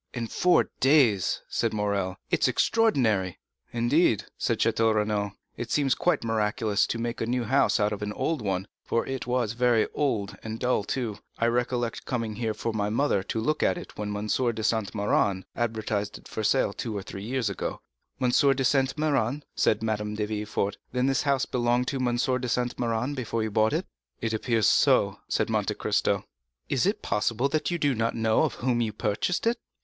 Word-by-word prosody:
"In 115 -1 -2
four 180 +10 +3
days," 130 - +3
said 115 -2 -1
Morrel; 100 -2 -1
"it - - +2
is - - +5
extraordinary!" 115 - +2 0.3
"Indeed," 120 - +2
said - - 0
Château 115 -1 +2
Renaud, 105 -1 0 0.2
"it - - -5
seems 140 -3 +2
quite 175 -7 +1
miraculous 110 -1 +1
to - - -2
make 115 +1 -3
a 115 - -1
new 125 0 0
house 135 +2 +2
out 105 0 +2
of 105 - -6
an 105 0 -2
old 160 +2 -1
one; 95 -2 -2 0.2
for 115 - 0
it 135 -2 -4
was 120 -3 0
very 120 -2 +3
old, 105 -9 -1
and 110 0 -5
dull 125 -4 +1
too. 110 -2 -3 0.2
I 115 - +1
recollect 120 0 -1
coming 115 -4 -2 0.2
for 115 - -3
my 105 -1 0
mother 115 -2 +1
to 100 +4 -3
look 155 +7 0
at - - +2
it 175 - -9
when 105 -1 -3
M. 105 - -4
de 115 0 0
Saint 110 -2 0
Méran 100 -2 +1
advertised 110 -3 -2
it - - -15
for 110 - -4
sale 105 -1 +2
two 110 -1 -4
or 100 - -4
three 95 - -8
years 125 +1 -1
ago." 100 - -3 0.4
"M. 125 -2 +2
de 135 0 +3
Saint 135 0 +2
Méran?" 145 -3 0
said 110 +1 +1
Madame 105 -1 -2
de 105 0 -1
Villefort; 105 -1 -2
"then 125 0 +1
this 135 -1 +2
house 140 -2 +1
belonged 120 0 +1
to 140 - -2
M. 130 - 0
de 125 0 0
Saint 125 +1 0
Méran 120 +3 -1
before 115 -4 -2
you 110 - -2
bought 110 +1 +3
it?" - - -1 0.3
"It 110 -1 -2
appears 110 -1 +1
so," - - +3
replied - - 0
Monte - - 0
Cristo. - - 0 0.4
"Is - - +2
it - - -1
possible 115 +5 +1
that 155 +1 0
you 175 - 0
do 145 -4 +2
not 115 0 -1
know 110 -1 +2
of - - 0
whom 120 -1 0
you 110 -2 0
purchased 105 - -1
it?" 235 +1 +1
115 Hz, 195 wpm, -27 LUFS, 105-130 Hz, 0.4 s, is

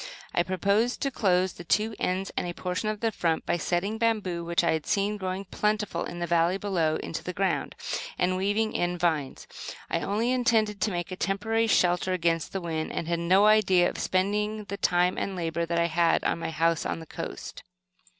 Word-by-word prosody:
I - - +3
proposed 200 +6 +1
to 275 - 0
close 185 -5 +2
the 175 - -10
two 215 +6 +1
ends 190 +2 -1
and - - -1
a 175 - -5
portion 185 +4 -2
of 215 -1 -4
the 225 -1 +1
front, 165 -5 -1
by 175 - +1
setting 190 +6 -1
bamboo, 210 -7 0
which 170 +1 +1
I 170 - +3
had 160 -2 -2
seen 200 +1 +1
growing 190 0 -4
plentifully 210 +2 -1
in 175 - -7
the 175 - -2
valley 170 +2 +2
below, 175 -6 0
into 165 - -5
the 180 - -4
ground, 195 +2 -1 0.4
and 185 +1 +1
weaving 205 +4 0
in 175 0 0
vines. 160 -6 -1 0.5
I - - +1
only 220 +5 0
intended 225 -5 +2
to 215 - +1
make 175 0 -3
a - - -3
temporary 220 +4 0
shelter 180 -2 +2
against 165 -2 0
the 195 - -2
wind, 160 -2 -3
and 165 - -3
had 170 0 0
no 185 +4 +4
idea 190 -4 +5
of - - -8
spending 210 +3 0
the 200 0 -6
time 180 0 +2
and 195 - -3
labor 170 -1 -2
that 170 0 -1
I 170 - +3
had 170 0 +2
on - - 0
my - - -3
house 165 0 +1
on - - -3
the 160 - -9
coast. - - -7
185 Hz, 210 wpm, -27 LUFS, 170-210 Hz, 0.5 s, idea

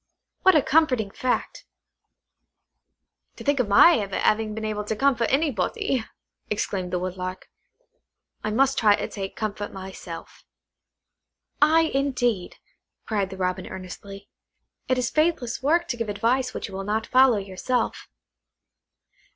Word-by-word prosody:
What 375 -2 +6
a 300 - +5
comforting 260 -9 +2
fact!" 255 +4 -2 1.7
"To - - -10
think 285 -1 +1
of 250 - +1
my 230 +9 +7
ever 200 -2 -4
having 215 0 +1
been 220 0 -4
able 210 -1 -2
to 220 - -2
comfort 245 -2 +2
anybody!" 265 - 0 0.5
exclaimed 190 -3 -2
the 180 - 0
Woodlark. 185 0 -5 1.0
"I 215 - -1
must 270 +5 +2
try 210 -2 +5
to - - -4
take 195 -2 -6
comfort 210 -1 -4
myself." 190 -3 -9 1.2
"Ay, 315 +2 +6
indeed," 245 -8 0 0.5
cried 200 -4 -1
the 190 - -8
Robin 185 0 -2
earnestly; 195 +2 -9 0.6
"it 255 - +1
is 250 -2 -1
faithless 305 -7 0
work 330 +5 +2
to 240 - -2
give 230 -2 -3
advice 250 +5 +1
which - - -5
you 200 - -12
will 195 +1 -4
not 215 +2 -1
follow 255 -3 +5
yourself." 200 +6 -2
220 Hz, 135 wpm, -25 LUFS, 195-260 Hz, 1.7 s, my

